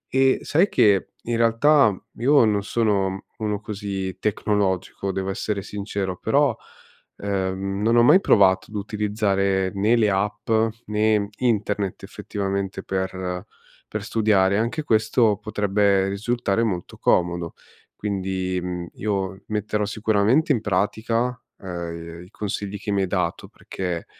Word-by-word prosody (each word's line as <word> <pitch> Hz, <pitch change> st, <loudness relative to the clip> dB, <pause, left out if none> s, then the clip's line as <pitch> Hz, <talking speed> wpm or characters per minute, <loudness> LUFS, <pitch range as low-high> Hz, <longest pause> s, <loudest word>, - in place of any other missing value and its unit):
E 135 Hz, 0 st, +4 dB
sai 175 Hz, +7 st, +3 dB
che 100 Hz, -3 st, +3 dB, 0.2 s
in 120 Hz, 0 st, -1 dB
realtà 115 Hz, +3 st, +4 dB, 0.3 s
io 130 Hz, +1 st, +5 dB
non 105 Hz, -2 st, +1 dB
sono 100 Hz, -4 st, 0 dB
uno 105 Hz, -2 st, -1 dB
così 100 Hz, -3 st, -4 dB
tecnologico, 100 Hz, -2 st, -1 dB
devo 95 Hz, 0 st, -2 dB
essere 100 Hz, 0 st, -3 dB
sincero, 100 Hz, -2 st, -4 dB
però, -, -, +2 dB, 0.6 s
ehm, 95 Hz, 0 st, -2 dB
non 115 Hz, +2 st, +3 dB
ho 120 Hz, -, +6 dB
mai 185 Hz, +10 st, +7 dB
provato 95 Hz, -2 st, +4 dB
ad 105 Hz, -, -12 dB
utilizzare 100 Hz, -2 st, 0 dB
né 105 Hz, +4 st, +2 dB
le 110 Hz, -3 st, +3 dB
app, 105 Hz, +3 st, -2 dB, 0.4 s
né 105 Hz, -1 st, +1 dB
internet, 105 Hz, -5 st, -1 dB
effettivamente, 100 Hz, -1 st, -4 dB
per 95 Hz, 0 st, -3 dB, 0.4 s
per 105 Hz, -1 st, -4 dB
studiare, 105 Hz, -3 st, +2 dB
anche 120 Hz, +8 st, -1 dB
questo 110 Hz, -2 st, +2 dB
potrebbe 100 Hz, -2 st, +1 dB
risultare 110 Hz, +1 st, -1 dB
molto 95 Hz, -6 st, -3 dB
comodo. 85 Hz, -1 st, +1 dB, 0.4 s
Quindi, 95 Hz, -2 st, -2 dB
mhmm, 90 Hz, -1 st, -4 dB
io 100 Hz, -2 st, -2 dB
metterò 105 Hz, 0 st, -1 dB
sicuramente 110 Hz, +8 st, +2 dB
in 120 Hz, -6 st, +2 dB
pratica, 110 Hz, +4 st, 0 dB, 0.3 s
uhm, 85 Hz, -2 st, -7 dB
i 90 Hz, -, -18 dB
consigli 105 Hz, -1 st, -4 dB
che 105 Hz, -, -4 dB
mi 100 Hz, -1 st, +1 dB
hai 95 Hz, -, 0 dB
dato 90 Hz, -3 st, -2 dB
perché, 90 Hz, -3 st, -5 dB
100 Hz, 130 wpm, -23 LUFS, 95-110 Hz, 0.6 s, mai